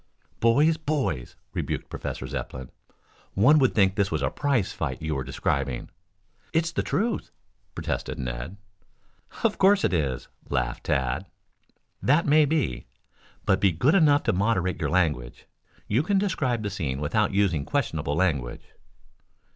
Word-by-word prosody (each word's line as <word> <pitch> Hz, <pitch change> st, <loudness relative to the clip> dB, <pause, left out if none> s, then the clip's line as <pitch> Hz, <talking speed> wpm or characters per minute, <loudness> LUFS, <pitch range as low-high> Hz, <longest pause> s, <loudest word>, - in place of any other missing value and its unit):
"Boys, 145 Hz, +8 st, +4 dB
boys!" 145 Hz, -, -2 dB, 0.2 s
rebuked -, -, -3 dB
Professor -, -, -5 dB
Zepplin. 65 Hz, -1 st, -6 dB, 0.6 s
"One 135 Hz, +10 st, +6 dB
would 130 Hz, -2 st, +2 dB
think 95 Hz, -3 st, +4 dB
this 100 Hz, -1 st, +1 dB
was -, -, -2 dB
a -, -, +1 dB
prize 140 Hz, -9 st, 0 dB
fight -, -, -3 dB
you 80 Hz, 0 st, -2 dB
were 70 Hz, -2 st, -2 dB
describing." 70 Hz, -1 st, -2 dB, 0.6 s
"It's 165 Hz, 0 st, +1 dB
the 165 Hz, -, 0 dB
truth," 225 Hz, +4 st, -1 dB, 0.5 s
protested -, -, -3 dB
Ned. 65 Hz, +8 st, -5 dB, 0.9 s
"Of -, -, +1 dB
course 195 Hz, 0 st, +5 dB
it -, -, +2 dB
is," 70 Hz, -7 st, -1 dB, 0.2 s
laughed 60 Hz, 0 st, -2 dB
Tad. 70 Hz, +5 st, 0 dB, 0.7 s
"That 150 Hz, +5 st, +3 dB
may 150 Hz, +1 st, +5 dB
be. 135 Hz, -, -1 dB, 0.6 s
But 95 Hz, -, +3 dB
be 100 Hz, -, +4 dB
good 125 Hz, -, +2 dB
enough 150 Hz, -6 st, +5 dB
to -, -, +1 dB
moderate 95 Hz, -2 st, 0 dB
your 75 Hz, -, 0 dB
language. 75 Hz, -9 st, 0 dB, 0.4 s
You 115 Hz, +6 st, +2 dB
can 195 Hz, +6 st, +1 dB
describe 140 Hz, -, 0 dB
the 105 Hz, -, -2 dB
scene 75 Hz, -9 st, -3 dB
without 100 Hz, +9 st, +1 dB
using 95 Hz, -7 st, +1 dB
questionable 80 Hz, -, -1 dB
language." 75 Hz, -9 st, 0 dB
100 Hz, 145 wpm, -26 LUFS, -, 0.9 s, One